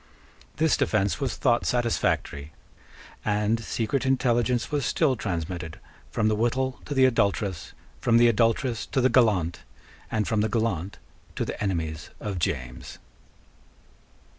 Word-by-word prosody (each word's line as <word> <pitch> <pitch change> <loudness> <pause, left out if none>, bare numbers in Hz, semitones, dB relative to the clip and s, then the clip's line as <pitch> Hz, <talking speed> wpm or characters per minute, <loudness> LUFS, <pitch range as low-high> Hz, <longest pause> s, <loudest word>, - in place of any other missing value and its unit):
This 160 0 +3
defence 100 - +1
was - - -2
thought 120 - +2
satisfactory; 110 - -1 0.7
and 105 +2 0
secret 120 +4 -1
intelligence 125 -2 +1
was 145 -2 0
still 135 +2 +2
transmitted 85 -5 -4 0.3
from 110 - 0
the 110 - +2
wittol 130 +4 0
to 145 - -4
the 130 -1 +6
adulteress, 100 -7 0 0.3
from 115 -1 +3
the 120 0 +6
adulteress 115 +1 +1
to - - 0
the 130 0 +4
gallant, 105 -10 +3 0.5
and 110 -1 -1
from 110 -2 +1
the 110 - +1
gallant 100 -5 -1 0.4
to - - -1
the - - -6
enemies 80 -4 -2
of 100 -4 -4
James. 65 -6 -3
110 Hz, 135 wpm, -26 LUFS, 95-120 Hz, 0.7 s, the